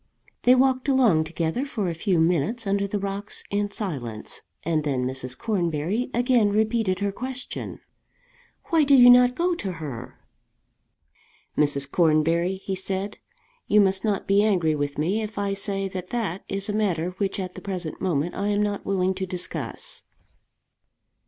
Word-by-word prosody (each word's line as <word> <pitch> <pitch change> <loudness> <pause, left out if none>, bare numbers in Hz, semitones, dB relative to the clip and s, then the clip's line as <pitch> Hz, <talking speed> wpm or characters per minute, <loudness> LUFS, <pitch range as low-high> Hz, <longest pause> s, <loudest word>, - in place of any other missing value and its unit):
They 250 +1 +6
walked 260 +1 +2
along 230 -13 +4
together 165 +8 -2
for 225 -9 -3
a 170 - -1
few 175 +1 0
minutes 175 - +1
under 200 0 +1
the 205 - -2
rocks 200 +1 -5
in 205 0 0
silence, 135 - -5 0.2
and 160 -2 0
then 135 -4 0
Mrs. 130 0 -5
Cornbury 185 +2 -1
again 245 -3 +3
repeated 215 -2 +1
her 200 0 0
question, 255 +5 -6 0.9
"Why 325 -4 +4
do 280 -1 +5
you 245 -1 +9
not 250 0 +6
go 350 +3 +1
to 195 - -4
her?" 150 -8 -7 1.4
"Mrs. 140 -2 +1
Cornbury," 165 +2 +2
he 190 0 -5
said, 190 +1 -3 0.5
"you 210 - +5
must 195 -1 +3
not 205 -4 0
be 200 +1 +4
angry 180 -7 +2
with 145 -1 -2
me 180 +9 0
if 215 0 -6
I 200 -1 0
say 195 0 -1
that 185 -1 -6
that 205 -7 -3
is 195 0 -2
a 210 - -2
matter 180 -5 0
which 200 -1 -1
at 185 -1 -4
the - - -9
present 180 -5 -5
moment 170 -2 0
I 200 - -2
am 205 0 +2
not 205 -1 -2
willing 190 -1 +1
to 190 0 -4
discuss." 180 0 -6
195 Hz, 165 wpm, -25 LUFS, 170-215 Hz, 1.4 s, you